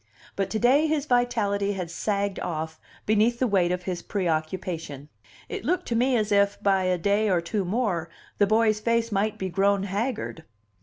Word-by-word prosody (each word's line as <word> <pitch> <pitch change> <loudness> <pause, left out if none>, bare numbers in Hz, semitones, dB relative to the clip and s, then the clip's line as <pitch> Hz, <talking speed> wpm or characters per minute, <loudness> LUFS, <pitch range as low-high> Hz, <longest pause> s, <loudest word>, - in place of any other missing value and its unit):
But 195 -1 -1
to 220 - -1
day 265 +7 +4
his 300 -2 0
vitality 220 -6 +1
had 180 -3 -5
sagged 200 -1 -1
off 160 -1 -4 0.3
beneath 220 +3 +3
the 255 - +1
weight 190 -6 +2
of 180 0 -2
his 175 -1 -3
preoccupation: 165 -5 -3 0.4
it - - -5
looked 360 +5 -1
to 235 - 0
me 250 +2 +3
as 215 -1 -1
if, 200 0 +3
by 195 -2 +3
a 185 0 +1
day 205 +4 +1
or 180 -3 +3
two 180 +4 -2
more, 185 -4 -1 0.3
the 205 - +5
boy's 215 0 +3
face 230 +1 0
might 210 +1 0
be 190 - -3
grown 195 +2 +2
haggard. 205 -3 -3
200 Hz, 185 wpm, -26 LUFS, 180-225 Hz, 0.4 s, the